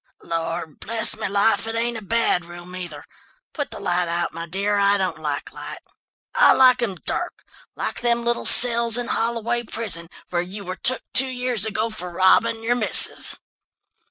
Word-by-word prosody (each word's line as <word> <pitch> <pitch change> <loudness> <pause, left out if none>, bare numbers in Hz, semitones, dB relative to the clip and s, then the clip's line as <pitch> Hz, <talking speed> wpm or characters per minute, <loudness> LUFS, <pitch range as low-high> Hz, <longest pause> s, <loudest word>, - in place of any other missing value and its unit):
"Lord, 165 -1 -5
bless 225 0 +2
me 215 - -5
life, 205 +3 0
it 225 - -4
ain't 235 +1 -2
a 225 - -7
bad 210 -3 0
room, 175 +1 -10
either. 170 -5 -8 0.5
Put 290 -2 -5
the - - -8
light 180 -2 -2
out, 170 0 -3
my 165 +1 -7
dear, 200 +4 -2
I 200 0 +2
don't 185 -5 -3
like 150 -2 -5
light. - - -9 0.6
I - - +5
like 255 -1 +4
'em 210 -6 -2
dark, - - -4 0.3
like - - -5
them 235 0 0
little 235 0 0
cells 235 -1 +7
in 245 -1 -3
Holloway 235 +1 -2
prison, 210 -8 -2 0.2
where 175 -1 -1
you 190 +3 -8
were 185 +1 -6
took 255 -1 -1
two 260 0 +4
years 250 -4 0
ago 220 +1 -3
for 180 -5 -8
robbing 225 +6 +2
your 235 +2 +1
missus." 245 - +5
215 Hz, 180 wpm, -21 LUFS, 175-235 Hz, 0.6 s, cells